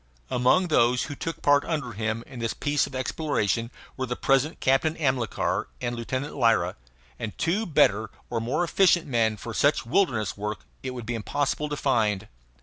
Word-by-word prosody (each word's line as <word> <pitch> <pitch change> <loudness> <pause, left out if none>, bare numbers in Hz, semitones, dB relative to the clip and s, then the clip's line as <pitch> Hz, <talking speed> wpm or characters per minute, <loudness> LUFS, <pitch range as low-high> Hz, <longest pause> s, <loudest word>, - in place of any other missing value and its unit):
Among 130 +10 +3
those 125 -4 +3
who 145 - -5
took 165 +3 -5
part 145 0 +5
under 150 -7 -2
him 110 +1 -2
in 130 -3 -10
this 115 -1 -2
piece 145 0 +1
of 135 - -10
exploration 130 - -1 0.3
were 130 - -3
the 125 - -2
present 135 +5 +1
Captain 135 +4 +2
Amilcar 130 - 0
and 120 0 -2
Lieutenant 130 +4 -3
Lyra; 115 -9 +2 0.4
and 110 -2 -5
two 200 +7 0
better 110 - +3 0.2
or 115 -2 -2
more 125 +9 0
efficient 175 0 +3
men 115 -6 +1
for 115 +2 -7
such 145 +1 +2
wilderness 120 - +1
work 105 +1 -5 0.2
it 130 -1 -5
would 120 -2 -6
be 120 - -2
impossible 145 +6 -1
to 145 - -3
find. 110 -7 +1
125 Hz, 175 wpm, -26 LUFS, 115-145 Hz, 0.4 s, part